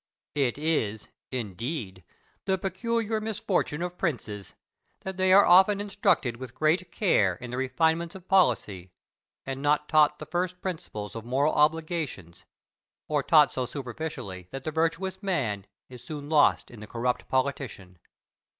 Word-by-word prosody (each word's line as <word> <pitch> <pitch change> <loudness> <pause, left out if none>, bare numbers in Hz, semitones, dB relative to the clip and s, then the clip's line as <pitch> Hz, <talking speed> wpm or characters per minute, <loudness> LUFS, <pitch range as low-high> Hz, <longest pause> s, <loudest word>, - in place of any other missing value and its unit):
Plato. 140 -3 +2
It 120 - -4
is, 145 -9 -1 0.2
indeed, 110 - -4 0.4
the 190 -1 +1
peculiar 220 +4 -1
misfortune 205 -7 -1
of 180 0 -5
princes, 105 - -3 0.5
that 190 0 -5
they 185 0 +3
are 200 +2 +8
often 190 +3 +6
instructed 200 - +1
with 130 -1 -9
great 165 +4 +1
care 105 - +2
in 120 +6 -9
the 125 - -4
refinements 160 +6 0
of 185 -1 -11
policy, 105 - +2 0.6
and 135 0 -4
not 150 +1 +2
taught 150 -1 +4
the - - -8
first 180 +1 -2
principles 160 - -5
of 115 - -5
moral 135 +6 +1
obligations, 155 - -1 0.6
or 150 -2 +1
taught 150 -1 +5
so 130 -1 -2
superficially 120 - -6
that 135 0 -7
the 155 - -3
virtuous 165 +4 -1
man 120 - -1 0.2
is 125 -2 -12
soon 150 -3 -7
lost 155 -2 +3
in 120 - -11
the 105 - -9
corrupt 120 +2 -2
politician. 130 -9 -2
150 Hz, 150 wpm, -27 LUFS, 120-180 Hz, 0.6 s, are